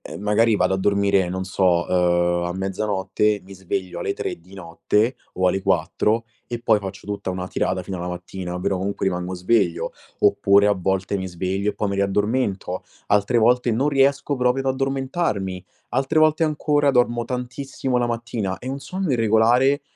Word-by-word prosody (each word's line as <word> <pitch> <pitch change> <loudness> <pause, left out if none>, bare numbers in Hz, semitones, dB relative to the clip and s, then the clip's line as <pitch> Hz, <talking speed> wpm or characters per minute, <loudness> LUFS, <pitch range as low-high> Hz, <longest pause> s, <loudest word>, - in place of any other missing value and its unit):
e - - -9
magari 105 +2 +2
vado 95 - +2
a - - -1
dormire, 100 -1 +2
non 95 +1 -3
so, 90 -2 +2
uhm, 85 -1 +2
a 85 - -2
mezzanotte, 100 +2 -1
mi 95 - -13
sveglio 95 -1 -4
alle 100 +3 -2
3 - - -4
di 90 +3 -17
notte 105 +6 0 0.2
o 95 0 +2
alle 95 +1 0
4 95 +5 +1 0.2
e 120 -1 -5
poi 110 - +4
faccio 95 0 -8
tutta 100 -1 -4
una 90 0 -4
tirata 95 0 -1
fino 95 +1 -6
a - - -5
la 90 - -4
mattina, 90 0 -6
però, 95 +1 -1
comunque, 100 +1 -2
rimango 90 0 -2
sveglio. 90 -1 +1 0.3
Oppure 100 +1 +4
a - - +4
volte 95 +1 -1
mi 95 - -4
sveglio 95 +3 -2
e - - -12
poi 105 - -1
mi 100 - -2
riaddormento. 100 -1 -1 0.2
Altre 105 +4 +2
volte, 125 +2 +3
non 130 +6 +1
riesco 140 0 +2
proprio 125 +1 +1
ad 135 0 +1
addormentarmi. 130 - -2 0.3
Altre 135 +3 +1
volte 155 +1 +4
ancora, 145 -1 +2
dormo 120 -2 +2
tantissimo 125 +1 -3
la 120 - +1
mattina. 115 -5 -3
È - - -11
un 135 +1 -3
sonno 185 +4 -3
irregolare 120 +4 +3
100 Hz, 180 wpm, -22 LUFS, 95-125 Hz, 0.3 s, poi